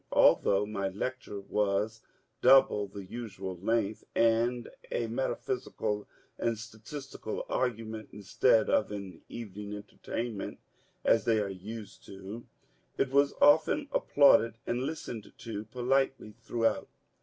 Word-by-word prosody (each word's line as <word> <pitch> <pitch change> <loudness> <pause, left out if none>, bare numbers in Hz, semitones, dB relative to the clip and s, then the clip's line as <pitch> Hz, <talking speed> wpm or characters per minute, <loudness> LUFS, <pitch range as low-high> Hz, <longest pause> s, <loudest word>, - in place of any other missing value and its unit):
Although 100 +1 +5
my 100 -2 -2
lecture 105 +1 -4
was 105 +2 0 0.4
double 130 -6 +6
the 100 0 -8
usual 95 -3 -6
length, 110 +2 0
and 115 +1 +2 0.2
a 120 - 0
metaphysical 115 -3 -2 0.3
and 115 -1 0
statistical 110 +2 -7
argument 110 -3 -2
instead 110 +3 +3
of 105 - +2
an 100 -4 -7
evening's 105 -2 -6
entertainment 110 +1 -5 0.5
(as 115 - +4
they 115 -2 +3
are 100 -2 -1
used 100 +3 -8
to), 100 +4 -8 0.5
it 130 - +1
was 140 +1 +3
often 160 - +5
applauded, 115 - +5
and 120 +1 -1
listened 130 -7 -5
to 110 -2 -6
politely 125 0 0
throughout. 115 0 0
110 Hz, 115 wpm, -30 LUFS, 105-120 Hz, 0.5 s, double